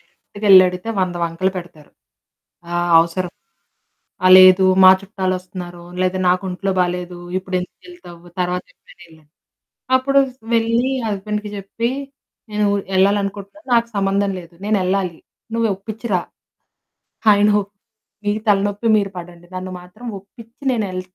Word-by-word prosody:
డైరెక్ట్‌గెళ్లి 200 -2 +4
అడిగితే 180 +4 -7
వంద 185 -1 -1
వంకలు 170 +3 -1
పెడతారు. 170 -4 -10 0.8
ఆ - - -2 0.2
అవసరం, 170 +2 -1 0.9
"ఆ! - - +5
లేదు 185 0 +7 0.2
మా 185 - +10
చుట్టాలోస్తున్నారు. 185 -3 -5 0.2
లేతే 185 0 0
నాకొంట్లో 185 +1 0
బాలేదు, 180 0 -2 0.2
ఇప్పుడెందుకెళ్తావు? 185 - -7 0.2
తరవాత 180 0 -1
ఎప్పుడైన 180 - -21
ఎళ్లని," 155 -2 -21 0.7
అప్పుడు 275 +1 +3 0.3
వెళ్ళి 230 +3 +1 0.2
హస్బండ్‌కి 210 +1 -3
జెప్పి 225 +5 -3 0.6
నేను 210 0 0
ఊరు 200 -1 -1
యెళ్ళాలనుకుంటున్నాను. 200 +7 0
నాకు 235 0 +2
సంబంధం 195 0 +1
లేదు, 170 0 -15
నేనెళ్ళాలి. 190 -4 0 0.4
నువ్వు 230 -1 +1
ఒప్పిచ్చిరా. 210 -1 -3 1.1
ఆయనొప్ 205 0 +2 0.5
మీ 205 - +2 0.2
తలనొప్పి 205 +2 +1
మీరు 200 -2 -1
పడండి. 175 0 -10
నన్ను 185 0 -5
మాత్రం 200 +7 -14
ఒప్పిచ్చి 230 +6 -17
నేనెల్ 195 -6 -2
195 Hz, 115 wpm, -19 LUFS, 180-210 Hz, 1.1 s, మా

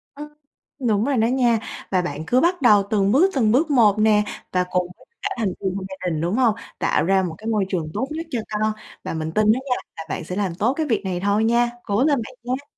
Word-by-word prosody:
Ừm. 295 +1 -8 0.6
Đúng 210 +1 +2
rồi 275 -2 0
đó 225 0 +3
nha. 240 -2 +2 0.3
Và 185 -2 +2
bạn 155 -2 -4
cứ 250 +5 +3
bắt 345 -1 +1
đầu 210 -4 +6
từng 200 -1 +2
bước, 360 +9 +5
từng 225 -5 +3
bước 300 +5 +2
một 215 -6 +4
nè, 215 -1 +4 0.3
và 180 0 +2
cùng 180 -1 +1
tất - - -20 0.2
cả - - 0
thành 215 -4 +1
viên 190 -1 -2
trong 190 -1 -4
gia 190 -1 -5
đình, 155 -1 -2
đúng 175 +7 0
hông, 240 -5 +3 0.2
tạo - - +1
ra 190 +1 +3
một 170 -3 -3
cái 220 - -11
môi 215 -3 +1
trường 165 -5 -2
tốt 260 - -1
nhất 320 +2 -5
cho 240 - -1
con 215 +1 +1 0.3
và - - -4
mình 160 0 -3
tin 215 +2 +4
đó 250 - 0
nha - - +4 0.2
là 160 - -6
bạn 160 - -4
sẽ 180 +3 -6
làm 190 -5 -1
tốt 225 +8 +1
cái 315 0 -1
việc 230 -5 0
này 180 -2 -2
thôi 205 +2 +1
nha. 235 +1 +3
Cố 210 +5 +1
lên 290 -3 +3
bạn 260 - -11
nha. 255 +3 -3
215 Hz, 265 wpm, -22 LUFS, 190-250 Hz, 0.6 s, đầu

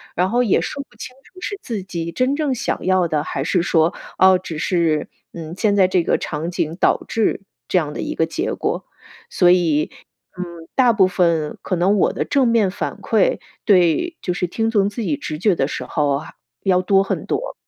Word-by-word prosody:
然 180 +2 +1
后 245 +2 +2
也 210 - +2
说 280 - -4
不 - - -23
清 255 - -8
楚 370 0 -17
是 405 - -4
自 220 -5 -4
己 170 -3 -4
真 255 +6 +1
正 295 -3 0
想 220 - -3
要 185 -2 +3
的， 150 -2 0
还 135 - -3
是 180 +2 +1
说， 165 -1 +2 0.3
哦， 190 0 +7
只 165 -4 -7
是 165 -4 0 0.2
嗯， 165 -1 -7
现 205 -2 +2
在 190 -2 +5
这 180 -2 +1
个 - - +2
场 160 +3 -4
景 170 -2 -2
导 - - +2
致 220 -2 0 0.3
这 185 - +1
样 150 -2 -3
的 - - -5
一 - - -3
个 160 - +2
结 - - -2
果。 - - -2 0.5
所 175 -1 +4
以 160 -4 +2 0.5
嗯， 170 -2 -7
大 250 -3 +5
部 190 -3 +4
分 170 -4 0
可 185 - -1
能 190 +4 +2
我 - - +2
的 - - -1
正 270 -4 +2
面 225 -4 +3
反 - - -4
馈 - - +2 0.3
对， 200 - +3
就 180 - -1
是 180 - -1
听 225 +5 -1
从 200 -3 +3
自 230 +3 -6
己 285 +7 -1
直 155 - -5
觉 195 -2 +3
的 135 - 0
时 - - -4
候， 145 -2 0
还 155 - -11 0.3
要 185 -1 +3
多 195 +1 +4
很 - - -3
多。 - - -2
185 Hz, 230 characters per minute, -20 LUFS, 165-220 Hz, 0.5 s, 哦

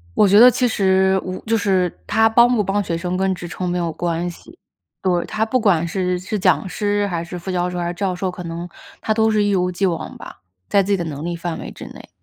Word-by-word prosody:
我 210 - +5
觉 200 +2 +6
得 245 +2 +10
其 250 +2 +1
实， 190 -3 +2
我 185 0 -5
就 225 0 +2
是 190 -4 +1 0.2
她 220 0 +4
帮 235 +2 +5
不 220 -4 +2
帮 200 +1 0
学 165 -2 -2
生 180 +1 -3
跟 190 0 +1
职 175 -1 -8
称 180 +1 -4
没 180 - -1
有 170 -2 -1
关 170 0 -2
系。 330 - -14 0.4
对， 175 -2 +1
她 220 +1 -1
不 255 +3 +1
管 175 -6 +2
是 180 0 -1
是 190 +4 -4
讲 185 0 +2
师 205 +4 -1
还 170 -3 -3
是 175 +1 -7
副 185 +2 -5
教 180 0 0
授 180 - -5
还 175 - -2
是 175 - -3
教 190 0 -2
授， 185 +1 -2
可 180 - -8
能， 170 +1 -5 0.3
她 215 - 0
都 220 0 +2
是 210 -1 +2
一 205 - +1
如 180 -2 +1
既 195 +2 -1
往 170 -3 -3
吧， - - -12 0.3
在 200 -1 +4
自 200 - -3
己 200 - +3
的 175 - -3
能 150 -1 -6
力 170 0 -3
范 165 -1 -4
围 - - -7
之 - - -10
内。 - - -12
185 Hz, 285 characters per minute, -20 LUFS, 175-205 Hz, 0.4 s, 得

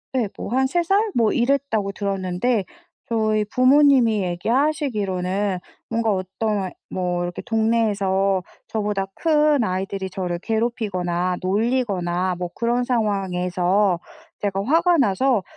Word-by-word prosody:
네 250 -5 +1
뭐 - - -6
한 265 +2 +2
3 345 +5 0
살 390 +4 +3 0.2
뭐 225 -3 +3
이랬다고 240 -6 0
들었는데 195 +2 -1 0.4
저희 215 -2 +1
부모님이 255 -2 +4
얘기 175 +3 -3
하시기로는 205 - 0 0.3
뭔가 225 -1 +1
어떤 190 +1 -2 0.2
뭐 180 -1 -1
이렇게 175 0 -4
동네에서 205 -5 +1 0.2
저보다 210 -3 -1
큰 300 -4 +3
아이들이 190 0 -3
저를 180 -2 -3
괴롭히거나 185 -5 -1
놀리거나 185 -4 0
뭐 180 0 -4
그런 240 +1 0
상황에서 190 -4 +1 0.4
제가 195 -1 -1
화가 335 +6 +3
나서 245 -2 +2
210 Hz, 270 characters per minute, -22 LUFS, 185-240 Hz, 0.4 s, 부모님이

